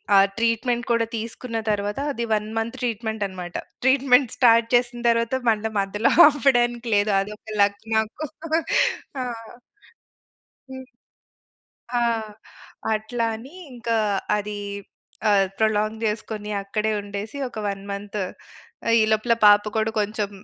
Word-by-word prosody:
ఆ - - +8 0.2
ట్రీట్మెంట్ 235 +1 0
కూడా 230 -1 +2
తీసుకున్న 230 +1 -5
తరువాత 205 +2 -1
అది 235 -4 -3
1 210 0 0
మంత్ 225 +3 -2
ట్రీట్మెంటనమాట. 210 -6 -3 0.3
ట్రీట్మెంట్ 260 -1 +4
స్టార్ట్ 230 -2 +5
చేసిన 240 0 +1
తరువాత 230 +2 +1
మళ్ళా 220 0 0
మధ్యలో 200 +3 +1 0.2
ఆపడానికి 240 -4 +2
లేదు. 205 +1 +2
అదొక 210 +2 -6
లక్ 200 0 +2
నాకు. 220 +7 -1 1.0
ఆ! - - -1 1.5
హ్మ్. 260 0 -8 1.1
ఆ! - - +1 0.9
అట్లా 220 +2 -2
అని 260 +8 -12 0.2
ఇంకా, 235 -2 -2 0.4
అదీ 210 0 -4 0.7
ఆహ్, 200 -2 +4
ప్రొలాంగ్ 215 0 0
జేసుకొని 210 -1 -3
అక్కడే 215 +2 -1
ఉండేసి, 205 +4 -6
ఒక 225 - -10
1 195 -1 -4
మంత్ 205 +1 -5 0.7
ఆహ్, 230 - +4
ఈ - - +5
లోపల 220 +2 +2
పాప 205 0 +7
కూడా 220 0 +1
కొంచెం 210 0 -2
220 Hz, 120 wpm, -23 LUFS, 210-235 Hz, 1.5 s, ఆ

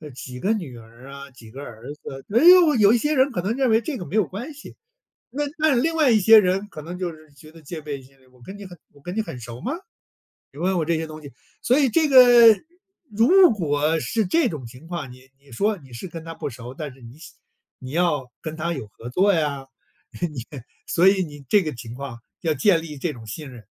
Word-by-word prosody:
几 125 -1 -8
个 205 - +1
女 160 - -6
儿 115 +3 -15
啊？ 140 0 -10
几 115 -3 -15
个 135 +4 -9
儿 115 -4 -11
子？ 135 -2 -10
“哎 235 - +4
呦， 350 -3 +7
有 210 -2 +5
一 - - +4
些 295 +6 0
人 270 +1 +3
可 180 - -2
能 200 +5 -1
认 265 -2 +2
为 225 +1 +3
这 270 +4 -4
个 180 - -7
没 195 - -6
有 215 -3 +3
关 240 - -7
系。 290 - -13 0.5
那 280 +5 -3 0.2
但 300 -6 +3
另 325 +3 0
外 305 -5 +4
一 220 - +4
些 220 +3 +8
人 195 +1 0
可 155 - -9
能 170 +4 -8
就 180 -2 -3
是 155 -1 -18
觉 155 +2 -16
得 165 0 -16
戒 155 +2 -7
备 145 -2 -6
心 135 +1 -21
理： 130 - -25
“我 125 -1 -24
跟 190 +11 -10
你 205 - -10
很 180 -2 -12 0.2
我 145 - -20
跟 175 +6 -7
你 220 - +1
很 135 - -8
熟 120 0 -9
吗？ 260 - -3 0.8
你 140 - -12
问 185 +1 +1
我 165 - 0
这 165 +1 0
些 160 0 -4
东 155 0 -9
西。 145 -3 -12 0.3
“所 250 - +2
以 275 - +3
这 315 +5 +2
个 245 -4 +8 0.6
如 335 - +5
果 155 -5 0
是 220 +7 -1
这 280 - +2
种 150 - -6
情 125 +7 -13
况， 170 -7 -6
你 130 +1 -16
你 140 0 -22
说 205 - 0
你 135 -6 -17
是 120 +10 -7
跟 165 -2 -8
他 165 0 -7
不 160 - -5
熟， 120 -1 -9
但 150 -1 -6
是 135 - -20
你 120 +4 -13
想 160 - -13 0.5
你 130 - -8
要 150 -5 0
跟 155 - -6
他 170 +2 -2
有 135 -9 -6
合 115 +3 -11
作 195 +10 +3
呀， 145 -5 -1 0.6
你 150 -9 -3 0.4
所 180 +3 +4
以 195 -1 +2
你 145 -3 -11
这 205 +5 +4
个 155 - -3
情 120 -1 -9
况 130 -3 -8 0.2
要 160 -2 0
建 190 -2 +3
立 155 -2 -8
这 155 +3 -2
种 115 -5 -12
信 140 +7 -7
任， 120 -3 -13
165 Hz, 265 characters per minute, -23 LUFS, 135-215 Hz, 0.8 s, 些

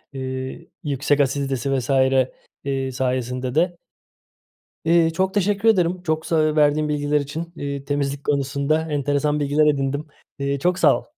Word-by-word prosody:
ııı, 130 0 -4 0.3
yüksek 145 -1 0
asiditesi 135 -1 0
vs. 125 - -6
ııı, 135 0 0
sayesinde 125 0 -2
de. 175 +2 +2 1.1
Iıı, 165 0 +4
çok 190 +3 0
teşekkür 205 +2 +2
ederim. 180 -3 +2
Çok 160 -2 -1
sa 155 -2 +2
verdiğin 150 0 +3
bilgiler 150 0 +1
için, 160 +4 -6
iii, 140 -2 -5
temizlik 140 0 -2
konusunda 140 +2 0
enteresan 145 +1 0
bilgiler 145 +1 +2
edindim, 145 +1 0 0.3
iii, 140 0 -1
çok 180 +4 +1
sağ - - +5
ol. - - -15
145 Hz, 140 wpm, -22 LUFS, 135-160 Hz, 1.1 s, sağ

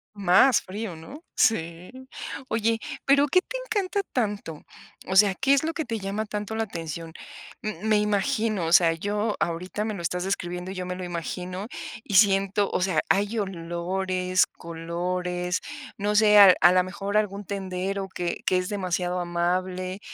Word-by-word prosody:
Más 200 +6 +5
frío, 200 -1 -6
¿no?, 260 - -11
sí, 170 -4 +1 0.6
¿oye, 225 0 0 0.3
pero 280 +1 +4
qué 365 +6 +4
te - - -6
encanta 405 -4 -1
tanto?, 205 - -2 0.4
o 190 - -3
sea, 195 -1 +6
¿qué 275 +5 +3
es 280 - +3
lo 325 +1 -1
que 315 - -3
te 230 -3 -3
llama 200 +2 -3
tanto 210 +1 -4
la 225 - 0
atención?, 165 -4 -6 0.5
m 215 -4 -5
me 215 -1 +3
imagino, 210 -1 0
o 165 - 0
sea, 170 -2 +6
yo 205 +5 -2
ahorita 180 +5 -2
me 215 - -2
lo 195 - -6
estás 180 +1 -2
describiendo 180 -1 -3
y - - -5
yo 180 -1 -4
me 180 - -3
lo 185 - -6
imagino 180 +3 -5 0.4
y 200 - -4
siento, 195 0 +4
o - - 0
sea, 180 -4 +2
hay 205 +3 +1
olores, 185 0 -1
colores, 180 +2 -3 0.4
no 205 +1 0
sé, 210 -1 +6
a 195 -3 +9
a 175 - +8
la 185 0 +4
mejor 195 +2 -5
algún 205 -1 -1
tendero 195 0 -3
que 175 -2 -4
que 185 - +3
es 180 +2 -2
demasiado 180 -3 -1
amable, 180 +2 -2
190 Hz, 170 wpm, -25 LUFS, 180-210 Hz, 0.6 s, a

